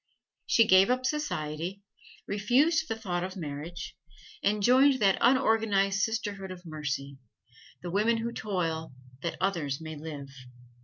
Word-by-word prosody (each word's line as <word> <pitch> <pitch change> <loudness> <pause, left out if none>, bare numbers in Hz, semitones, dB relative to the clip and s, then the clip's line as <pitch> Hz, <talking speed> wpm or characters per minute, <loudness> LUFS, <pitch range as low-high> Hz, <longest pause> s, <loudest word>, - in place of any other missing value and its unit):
She 230 - +5
gave 190 0 +6
up 255 +1 +1
society, 185 - -3 0.4
refused 275 +11 +2
the 225 - -2
thought 180 -6 -3
of 185 0 -5
marriage, 160 +2 -6 0.5
and 205 0 +1
joined 260 +3 +5
that 195 -3 +3
unorganized 220 -6 +3
sisterhood 205 -3 -2
of 180 -1 -9
mercy 140 -3 -4 0.6
the 175 - -4
women 215 +5 +2
who 230 +1 -3
toil 165 -7 -3 0.3
that 170 - -3
others 165 -8 -1
may 160 -1 -7
live. 145 -2 -7
195 Hz, 135 wpm, -29 LUFS, 160-225 Hz, 0.6 s, gave